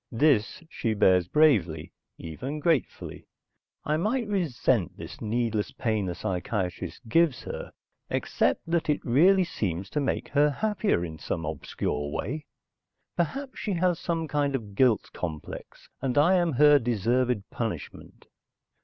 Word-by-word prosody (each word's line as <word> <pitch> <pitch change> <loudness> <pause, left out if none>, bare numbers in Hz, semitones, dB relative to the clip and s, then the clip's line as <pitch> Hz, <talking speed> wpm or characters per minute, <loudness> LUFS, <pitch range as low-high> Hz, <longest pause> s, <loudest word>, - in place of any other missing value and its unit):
This 140 - +2
she 115 -8 -2
bears 90 -3 +4
bravely, 90 - +2 0.2
even 130 - -6
gratefully. 155 -3 -1 0.6
I 150 +1 +1
might 225 +7 0
resent 130 - 0
this - - -9
needless 110 -1 -1
pain 110 -4 -1
the 90 - -3
psychiatrist 95 +2 -3
gives 145 +1 +2
her, - - -6 0.4
except 85 - 0
that 165 -1 0
it 150 - 0
really 180 +10 +5
seems 95 - -3
to 150 - 0
make 140 - -1
her 145 +1 +4
happier 205 - 0
in 80 -2 -8
some 80 - -3
obscure 75 -1 -3
way. 145 - -4 0.7
Perhaps 265 - -2
she 205 - -2
has 175 -1 +1
some 165 -2 -2
kind 145 -2 0
of 105 -6 -5
guilt 120 0 +3
complex, 80 -4 -7
and 135 0 -1
I 160 +6 +5
am 175 -4 +2
her 145 +2 +6
deserved 120 0 +1
punishment? 110 -10 -6
125 Hz, 135 wpm, -27 LUFS, 100-160 Hz, 0.7 s, her